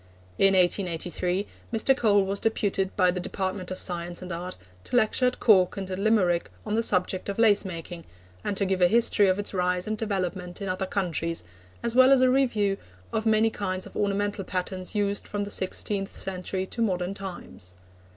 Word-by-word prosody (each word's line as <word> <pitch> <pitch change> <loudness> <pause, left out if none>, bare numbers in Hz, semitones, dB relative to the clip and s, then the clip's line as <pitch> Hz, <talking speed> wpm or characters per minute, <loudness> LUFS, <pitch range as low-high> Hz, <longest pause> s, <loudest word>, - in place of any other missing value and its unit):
In 195 0 +5
1883, 180 0 0 0.3
Mr. 235 +4 +3
Cole 205 -5 +3
was 195 +1 -2
deputed 200 -3 -1
by 180 -2 +4
the 180 - -3
Department 185 0 -3
of 185 - -5
Science 175 0 -3
and 180 - -7
Art 175 +2 -5 0.3
to - - -4
lecture 245 +2 +3
at 250 - -2
Cork 195 -5 +4
and 190 -1 -5
at 185 - -3
Limerick 195 - +2 0.2
on - - -3
the 225 - +2
subject 185 -2 +1
of 200 - -3
lace 220 -3 +5
making, 170 -2 -7 0.4
and 200 - -2
to 200 - +2
give 190 -1 0
a 180 - +7
history 220 0 +4
of 185 0 +2
its 205 0 -3
rise 180 -1 0
and 215 - -2
development 185 -4 -3
in 200 - -4
other 185 +1 -2
countries, 170 -4 -1 0.4
as 235 -1 0
well 255 +2 +6
as 270 -2 +6
a 255 0 +5
review 220 -7 +2 0.4
of 220 0 -1
the - - +4
many 220 +1 +3
kinds 185 -3 -3
of - - -13
ornamental 205 0 -1
patterns 185 +1 -3
used 205 -1 0
from 205 -1 -3
the 200 - -6
sixteenth 195 +1 -1
century 185 0 -3
to 230 - -5
modern 185 -3 0
times. 180 - -9
195 Hz, 195 wpm, -26 LUFS, 180-210 Hz, 0.4 s, a